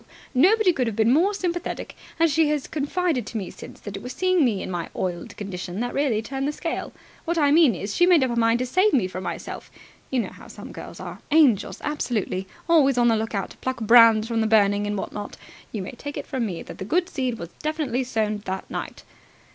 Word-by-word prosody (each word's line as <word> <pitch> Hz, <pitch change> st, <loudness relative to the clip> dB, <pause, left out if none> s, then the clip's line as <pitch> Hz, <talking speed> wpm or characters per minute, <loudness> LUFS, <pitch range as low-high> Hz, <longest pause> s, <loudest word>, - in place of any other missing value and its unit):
Nobody 370 Hz, -, +5 dB
could 255 Hz, -6 st, 0 dB
have 225 Hz, -, -2 dB
been 225 Hz, +2 st, +3 dB
more 350 Hz, +8 st, +4 dB
sympathetic. 355 Hz, -4 st, -3 dB, 0.2 s
And 330 Hz, -, +5 dB
she 315 Hz, 0 st, +2 dB
has 300 Hz, -2 st, 0 dB
confided 310 Hz, -1 st, -1 dB
to 230 Hz, -, -4 dB
me 195 Hz, -4 st, -4 dB
since -, -, -11 dB
that 205 Hz, -2 st, -7 dB
it 195 Hz, -, -6 dB
was 250 Hz, +1 st, -6 dB
seeing 370 Hz, -3 st, +2 dB
me 220 Hz, -7 st, +1 dB
in -, -, -5 dB
my 175 Hz, -2 st, -3 dB
oiled 175 Hz, -2 st, -4 dB
condition 185 Hz, -2 st, -5 dB
that 245 Hz, -, -2 dB
really 255 Hz, -6 st, +1 dB
turned 270 Hz, +3 st, -3 dB
the -, -, 0 dB
scale. 330 Hz, +2 st, -4 dB, 0.3 s
What 340 Hz, 0 st, -1 dB
I 290 Hz, -3 st, +4 dB
mean 305 Hz, -, +5 dB
is, 200 Hz, +3 st, -4 dB
she 350 Hz, -, +4 dB
made 345 Hz, -6 st, +6 dB
up 255 Hz, -, 0 dB
her -, -, -1 dB
mind 230 Hz, 0 st, +3 dB
to 255 Hz, -, -1 dB
save 370 Hz, +11 st, +2 dB
me 235 Hz, -9 st, +3 dB
from 185 Hz, 0 st, -6 dB
myself. -, -, -6 dB, 0.4 s
You 260 Hz, -2 st, +1 dB
know -, -, -5 dB
how -, -, -13 dB
some -, -, -10 dB
girls -, -, -9 dB
are. -, -, -7 dB
Angels 290 Hz, -9 st, +3 dB
absolutely! 220 Hz, -10 st, -2 dB, 0.2 s
Always 285 Hz, -6 st, +4 dB
on 240 Hz, -1 st, +4 dB
the 225 Hz, -, +4 dB
look 220 Hz, 0 st, -2 dB
out 195 Hz, -, -2 dB
to -, -, -14 dB
pluck 260 Hz, -1 st, -3 dB
brands 225 Hz, -1 st, +6 dB
from 230 Hz, -1 st, 0 dB
the 220 Hz, -, +2 dB
burning, 205 Hz, -1 st, +3 dB
and 205 Hz, 0 st, -2 dB
what -, -, -5 dB
not. 205 Hz, 0 st, -6 dB, 0.3 s
You 210 Hz, -4 st, -4 dB
may -, -, -6 dB
take 285 Hz, +3 st, -7 dB
it -, -, -5 dB
from 255 Hz, -5 st, -2 dB
me 175 Hz, -4 st, -5 dB
that -, -, -11 dB
the -, -, -3 dB
good 345 Hz, -, +1 dB
seed 255 Hz, -8 st, -2 dB
was 170 Hz, -5 st, -7 dB
definitely 305 Hz, -5 st, -1 dB
sown 215 Hz, -4 st, -1 dB
that 190 Hz, 0 st, -4 dB
night." -, -, -5 dB
245 Hz, 240 wpm, -24 LUFS, 210-305 Hz, 0.4 s, made